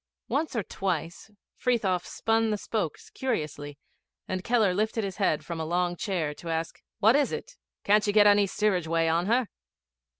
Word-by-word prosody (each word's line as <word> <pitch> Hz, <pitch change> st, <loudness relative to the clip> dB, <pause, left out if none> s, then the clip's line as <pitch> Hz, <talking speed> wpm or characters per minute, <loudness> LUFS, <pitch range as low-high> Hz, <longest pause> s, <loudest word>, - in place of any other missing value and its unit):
Once 305 Hz, -1 st, -1 dB
or 225 Hz, -, 0 dB
twice 175 Hz, -1 st, -3 dB, 0.3 s
Frithiof 200 Hz, -8 st, 0 dB
spun 225 Hz, 0 st, +1 dB
the 210 Hz, -, 0 dB
spokes 200 Hz, -6 st, -4 dB
curiously, 145 Hz, -, -3 dB, 0.5 s
and 185 Hz, 0 st, -3 dB
Keller 225 Hz, -5 st, +3 dB
lifted 215 Hz, +3 st, 0 dB
his 195 Hz, -2 st, -4 dB
head 190 Hz, -7 st, +1 dB
from 170 Hz, -2 st, -5 dB
a -, -, -1 dB
long 175 Hz, +2 st, 0 dB
chair 175 Hz, -6 st, -2 dB
to 165 Hz, +3 st, -9 dB
ask, 165 Hz, 0 st, -3 dB, 0.2 s
'What 220 Hz, +4 st, +5 dB
is 290 Hz, -1 st, +2 dB
it? -, -, -6 dB, 0.3 s
Can't 210 Hz, +1 st, +3 dB
you -, -, +3 dB
get 210 Hz, -1 st, +6 dB
any 205 Hz, -1 st, +5 dB
steerage 190 Hz, -4 st, 0 dB
way 165 Hz, 0 st, +1 dB
on 165 Hz, +3 st, +1 dB
her?' 240 Hz, +1 st, +2 dB
195 Hz, 175 wpm, -27 LUFS, 165-220 Hz, 0.5 s, get